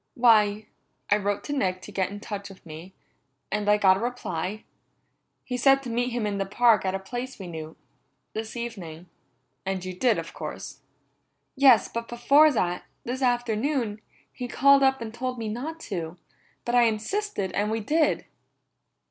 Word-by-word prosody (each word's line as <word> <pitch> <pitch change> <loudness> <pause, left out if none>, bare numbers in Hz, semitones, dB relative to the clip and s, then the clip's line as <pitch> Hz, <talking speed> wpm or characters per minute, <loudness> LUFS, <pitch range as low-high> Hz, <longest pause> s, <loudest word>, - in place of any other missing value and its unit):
"Why, 215 -3 +4 0.5
I 205 - +6
wrote 205 0 -2
Nick 190 -11 -1
to - - -9
get 190 -2 0
in 205 +1 -7
touch 200 -1 -6
with 190 -2 -15
me, 165 +4 -10 0.6
and 210 0 0
I 210 - +6
got 190 -2 +5
a - - -4
reply. 215 -5 -3 0.8
He 250 - -3
said 270 +2 +4
to 245 - -5
meet 245 +2 0
him 240 -2 -2
in 200 -1 -2
the 195 - 0
park 225 0 +4
at 190 0 0
a - - -2
place 245 +7 -6
we 195 - -8
knew. 160 -2 -7 0.6
This 220 +1 -5
evening." 180 -8 -7 0.5
"And 190 -1 -3
you 185 - -4
did, 235 +6 +2
of - - -6
course." - - -7 0.8
"Yes, 265 -3 +6
but 230 0 -5
before 280 +6 +5
that, 180 -8 -1 0.2
this 255 +3 -4
afternoon, 240 -2 0 0.3
he 250 - -5
called 275 +3 +5
up 265 -1 +3
and 220 -1 -6
told 255 +1 -3
me 225 -2 -3
not 290 +9 -5
to, 170 -3 -5 0.5
but 240 - -2
I 245 -1 +6
insisted 225 - -1
and 205 +1 0
we 225 +1 -1
did." 300 +8 +1
220 Hz, 175 wpm, -26 LUFS, 195-245 Hz, 0.8 s, I